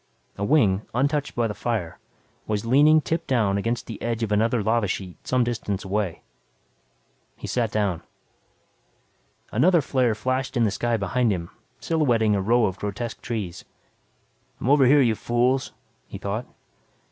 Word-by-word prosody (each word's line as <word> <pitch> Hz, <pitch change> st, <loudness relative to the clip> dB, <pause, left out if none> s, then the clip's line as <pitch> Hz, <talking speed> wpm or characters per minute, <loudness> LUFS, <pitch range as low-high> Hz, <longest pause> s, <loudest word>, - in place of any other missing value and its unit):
A 100 Hz, -, -5 dB
wing, 105 Hz, -7 st, +3 dB
untouched 140 Hz, +2 st, 0 dB
by 120 Hz, -, +1 dB
the 110 Hz, -, -2 dB
fire, 105 Hz, -8 st, -3 dB, 0.5 s
was 105 Hz, 0 st, -2 dB
leaning 150 Hz, +6 st, +5 dB
tip 165 Hz, +3 st, -3 dB
down 110 Hz, -7 st, +2 dB
against 115 Hz, +3 st, -2 dB
the 115 Hz, -4 st, -8 dB
edge 115 Hz, -1 st, -2 dB
of 110 Hz, -, -2 dB
another 110 Hz, +2 st, +2 dB
lava 110 Hz, 0 st, +1 dB
sheet 90 Hz, -1 st, -4 dB
some 130 Hz, -1 st, +2 dB
distance 110 Hz, -4 st, -3 dB
away. 95 Hz, -3 st, -2 dB, 1.1 s
He -, -, -8 dB
sat 115 Hz, -3 st, -1 dB
down. 100 Hz, -6 st, 0 dB, 1.5 s
Another 170 Hz, -, +4 dB
flare 130 Hz, -5 st, +1 dB
flashed 130 Hz, +4 st, -2 dB
in 120 Hz, -, +3 dB
the 105 Hz, -, +2 dB
sky 120 Hz, +2 st, 0 dB
behind 115 Hz, +4 st, +1 dB
him 85 Hz, -3 st, -4 dB, 0.3 s
silhouetting 120 Hz, -10 st, +2 dB
a 100 Hz, -, +1 dB
row 115 Hz, +4 st, +3 dB
of 95 Hz, -1 st, -3 dB
grotesque 110 Hz, +3 st, -5 dB
trees. 105 Hz, -7 st, -5 dB, 1.0 s
I'm 130 Hz, -, 0 dB
over 140 Hz, -3 st, +5 dB
here, 145 Hz, +2 st, +6 dB
you 120 Hz, -4 st, +3 dB
fools, 125 Hz, +4 st, 0 dB, 0.4 s
he -, -, -8 dB
thought. 110 Hz, +5 st, -4 dB
115 Hz, 155 wpm, -24 LUFS, 105-130 Hz, 1.5 s, here